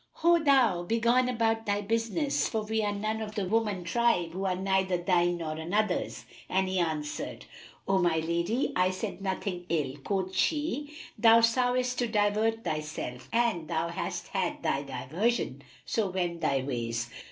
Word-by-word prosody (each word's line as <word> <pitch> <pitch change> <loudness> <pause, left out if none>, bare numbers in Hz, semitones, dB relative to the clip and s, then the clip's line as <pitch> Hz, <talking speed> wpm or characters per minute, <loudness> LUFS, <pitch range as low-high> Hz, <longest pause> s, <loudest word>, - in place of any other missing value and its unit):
"Ho, 340 0 +3
thou! 260 - +4
Begone 235 +6 +2
about 225 -2 0
thy 205 0 +1
business, 230 +8 0
for 220 -2 -1
we 220 +1 -1
are 205 - +1
none 215 +2 -2
of 215 -1 -6
the 200 - -1
woman 210 -3 0
tribe 175 -2 +1
who 190 +3 -4
are 185 -1 +1
neither 190 -1 +1
thine 175 0 +2
nor 165 -2 -4
another's.[FN#310]" 175 +8 -1 0.2
And 190 0 +1
he 185 0 0
answered, 155 -3 -3 0.4
"O 195 0 +3
my 175 -3 +2
lady, 170 - 0
I 180 0 +3
said 185 +1 -4
nothing 190 -2 -3
ill." 145 -4 -1
Quoth 190 -2 -1
she, 295 -1 0 0.3
"Thou 230 0 +7
soughtest 250 +2 +2
to 245 - +1
divert 220 +1 +1
thyself[FN#311] 150 - -4
and 230 -9 +1
thou 165 0 -1
hast - - -4
had - - -2
thy 135 - +1
diversion; 155 - -2 0.2
so 215 -4 0
wend 175 -2 -2
thy 135 -2 +1
ways." 120 -3 -3
195 Hz, 165 wpm, -29 LUFS, 170-225 Hz, 0.4 s, Thou